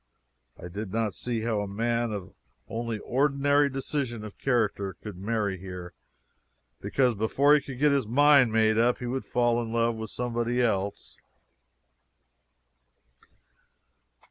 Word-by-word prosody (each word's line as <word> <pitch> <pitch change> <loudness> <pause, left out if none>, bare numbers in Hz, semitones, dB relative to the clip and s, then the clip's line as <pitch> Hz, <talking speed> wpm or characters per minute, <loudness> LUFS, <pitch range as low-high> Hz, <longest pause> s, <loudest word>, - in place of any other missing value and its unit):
I - - -8
did 100 +3 -6
not 110 -1 -1
see 120 -2 -3
how 110 -2 0
a 100 - -3
man 115 +3 -1
of 100 -3 -6 0.3
only 115 -1 -3
ordinary 140 +4 +2
decision 135 -4 -3
of 105 -2 -10
character 105 -6 0
could 105 -3 -9
marry 100 0 -2
here, 90 -1 -8 0.9
because 125 +5 +1
before 125 +7 +3
he 150 - +5
could 135 -2 -8
get 150 +2 +3
his 140 -5 +1
mind 140 0 +5
made 110 0 +3
up 120 +1 +3
he 125 - -6
would 130 +2 -3
fall 120 -1 +1
in 115 -1 -5
love 115 0 +1
with 110 -1 -6
somebody 120 0 -2
else. 100 -5 -1
115 Hz, 140 wpm, -27 LUFS, 105-125 Hz, 0.9 s, he